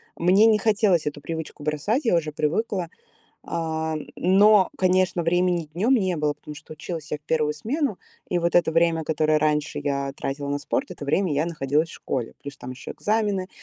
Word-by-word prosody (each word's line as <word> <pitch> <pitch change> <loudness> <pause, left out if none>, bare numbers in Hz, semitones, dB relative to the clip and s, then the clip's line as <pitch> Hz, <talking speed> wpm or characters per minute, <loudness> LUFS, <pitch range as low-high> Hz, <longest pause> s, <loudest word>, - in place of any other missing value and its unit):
мне 185 +5 +4
не 220 -1 +5
хотелось 210 -5 +2
эту 145 0 -4
привычку 160 -1 -6
бросать, 155 - -1
я 225 - +3
уже 155 -2 0
привыкла. 170 +4 -1 0.6
А, 160 -1 -2 0.2
но, 195 +2 +5
конечно, 185 -1 +2
времени 175 -1 +1
днем 215 +11 +2
не 190 -7 +1
было, 150 -1 0
потому 150 +1 -10
что 155 - -11
училась 155 0 -7
я 150 - -1
в - - -45
1 150 0 0
смену, 245 - -2 0.3
и 180 - +1
вот 170 0 +1
это 170 -2 +3
время, 165 -1 +2
которое 155 0 +2
раньше 150 0 0
я 140 -1 -2
тратила 140 +1 -4
на 145 0 -1
спорт, 145 - -2
это - - -7
время 165 +4 +1
я 145 +3 +1
находилась 155 -1 0
в - - -11
школе. 125 -4 -4
Плюс 140 0 -8
там 125 - -8
еще 125 -2 -9
экзамены, 205 -3 -1
165 Hz, 190 wpm, -24 LUFS, 150-185 Hz, 0.6 s, не